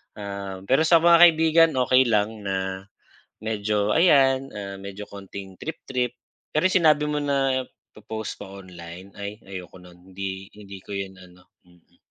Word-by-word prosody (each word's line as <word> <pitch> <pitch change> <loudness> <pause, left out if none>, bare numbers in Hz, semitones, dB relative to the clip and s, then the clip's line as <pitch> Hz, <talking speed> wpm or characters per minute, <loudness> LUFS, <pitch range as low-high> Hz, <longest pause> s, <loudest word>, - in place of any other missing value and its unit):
Um, 100 -2 -6
pero 135 +9 +3
sa 165 -1 +5
mga 170 0 +7
kaibigan, 165 -1 +6
okey 130 0 +4
lang 110 0 +1
na 95 0 -3 0.6
medyo 105 -1 0
ayan, 135 -3 +4
ah, 100 -1 -6
medyo 100 +1 -8
kaunting 95 -1 -9
trip-trip, 125 -6 -3 0.4
pero 155 - +2
yung 185 - +4
sinabi 155 -3 +4
mo 150 - 0
na, 135 -2 0 0.3
po-post 110 0 -6
ko 100 0 -9
online, 90 +1 -11
ay, 100 +2 -6
ayoko 90 -1 -9
no'n. 90 +1 -17
Hindi 95 0 -5
hindi 100 -2 -11
ko - - -9
yun 95 -1 -5
ano, 90 0 -17 0.2
mm. 90 -1 -26
105 Hz, 155 wpm, -24 LUFS, 95-135 Hz, 0.6 s, mga